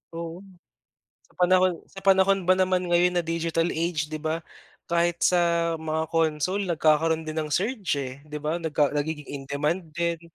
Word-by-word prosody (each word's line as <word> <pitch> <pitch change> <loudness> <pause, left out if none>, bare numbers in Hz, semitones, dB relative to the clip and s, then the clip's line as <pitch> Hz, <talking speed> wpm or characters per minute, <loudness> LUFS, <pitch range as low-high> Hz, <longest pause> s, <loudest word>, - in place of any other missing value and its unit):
Oo. 170 +1 -6 0.9
Sa - - -28
panahon 185 +1 +4 0.2
sa 195 - -10
panahon 195 0 +4
ba 185 - +5
naman 185 -1 +2
ngayon 175 +1 +3
na 175 - +1
digital 165 0 0
age, 160 -2 -2
'di 155 - -4
ba, 160 +1 -2 0.4
kahit 170 0 +1
sa 170 -1 +2
mga 160 0 -1
console 165 +5 0
nagkakaroon 160 0 +2
din 155 0 -3
ng 155 - -4
surge, 200 - -1
eh, 130 -2 -4
'di 150 0 -5
ba, 165 +3 -1
nagka 150 -3 +1
nagiging 150 0 -2
in 140 -1 -6
demand 155 +5 -1
din. 170 -1 -1
165 Hz, 170 wpm, -25 LUFS, 155-180 Hz, 0.9 s, ba